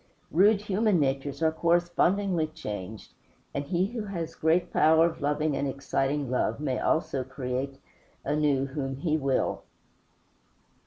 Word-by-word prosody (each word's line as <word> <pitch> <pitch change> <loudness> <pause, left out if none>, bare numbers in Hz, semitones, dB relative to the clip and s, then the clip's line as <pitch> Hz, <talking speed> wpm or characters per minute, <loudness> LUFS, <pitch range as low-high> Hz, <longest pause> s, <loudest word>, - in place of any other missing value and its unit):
Rude 200 +5 +4
human 210 -2 +1
natures 140 +2 -1
are 160 - +4
correspondingly 175 +1 +1
changed, 105 -8 -7 0.4
and 140 - -2
he 180 +3 +1
who 230 +3 -4
has 170 -5 -4
great 160 +3 +1
power 160 +1 +5
of 170 -2 -3
loving 150 +1 0
and 140 - -1
exciting 140 0 -1
love 120 -2 0
may 135 -4 -1
almost 160 - 0 0.2
create 130 +1 -3 0.5
anew 145 -2 +1
whom 135 -1 -4
he 155 +3 0
will. 135 -4 0
150 Hz, 130 wpm, -28 LUFS, 135-170 Hz, 0.5 s, power